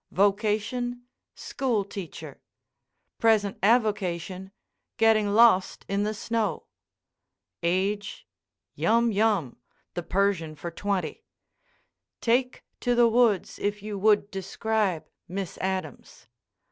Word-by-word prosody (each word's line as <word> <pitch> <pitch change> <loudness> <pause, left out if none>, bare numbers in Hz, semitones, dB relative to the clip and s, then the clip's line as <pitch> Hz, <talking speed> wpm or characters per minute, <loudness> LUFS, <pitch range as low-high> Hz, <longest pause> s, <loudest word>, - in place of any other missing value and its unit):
Vocation, 220 +5 0 0.3
school 240 -7 -1
teacher. 195 -4 -8 0.8
Present 215 -3 +2
avocation, 190 -4 0 0.5
getting 215 -3 +3
lost 225 -5 +4
in 200 +1 0
the 215 +1 -1
snow. 225 0 -2 1.0
Age, 200 +4 -1 0.5
yum 230 +1 +2
yum 205 - +1 0.4
(the 175 - -3
Persian 175 -3 0
for 170 +3 -6
twenty). 185 -3 -3 1.0
Take 250 +2 0 0.2
to 245 0 +1
the 240 0 +6
woods 230 -4 +2
if 205 0 -2
you 210 -1 -5
would 210 0 +3
describe 195 -1 -1 0.2
Miss 190 0 -5
Adams. 190 0 -5
205 Hz, 95 wpm, -26 LUFS, 190-225 Hz, 1.0 s, the